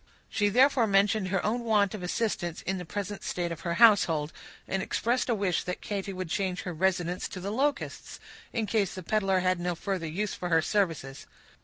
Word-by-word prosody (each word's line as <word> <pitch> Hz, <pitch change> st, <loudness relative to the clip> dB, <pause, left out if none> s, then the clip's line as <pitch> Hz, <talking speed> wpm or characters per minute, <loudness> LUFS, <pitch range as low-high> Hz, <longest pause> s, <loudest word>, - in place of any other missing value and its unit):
She 205 Hz, -1 st, +2 dB
therefore 250 Hz, +1 st, +4 dB
mentioned 200 Hz, 0 st, +3 dB
her 190 Hz, -1 st, -1 dB
own 230 Hz, +3 st, 0 dB
want 210 Hz, -4 st, +2 dB
of 210 Hz, -, -5 dB
assistance 180 Hz, -2 st, -2 dB
in 190 Hz, 0 st, -2 dB
the 180 Hz, -, -6 dB
present 205 Hz, +3 st, -5 dB
state 175 Hz, -1 st, -2 dB
of 165 Hz, -, -5 dB
her 170 Hz, -1 st, -2 dB
household, 170 Hz, -9 st, +5 dB, 0.3 s
and 195 Hz, -, -1 dB
expressed 240 Hz, +6 st, 0 dB
a 235 Hz, -, +3 dB
wish 195 Hz, -4 st, 0 dB
that 180 Hz, -, -3 dB
Katy 200 Hz, -1 st, -3 dB
would 185 Hz, -1 st, -4 dB
change 185 Hz, 0 st, -1 dB
her 180 Hz, -, -4 dB
residence 180 Hz, +1 st, 0 dB
to 185 Hz, -, -7 dB
the 195 Hz, +3 st, -4 dB
Locusts, 280 Hz, +5 st, -2 dB, 0.3 s
in 225 Hz, -2 st, -1 dB
case 205 Hz, -4 st, 0 dB
the 185 Hz, -, -7 dB
peddler 195 Hz, -1 st, +1 dB
had 185 Hz, -1 st, +1 dB
no 175 Hz, 0 st, -1 dB
further 185 Hz, -1 st, -3 dB
use 200 Hz, +6 st, -2 dB
for 180 Hz, -, -4 dB
her 165 Hz, -1 st, +5 dB
services. 165 Hz, -10 st, -1 dB
190 Hz, 200 wpm, -28 LUFS, 180-210 Hz, 0.3 s, household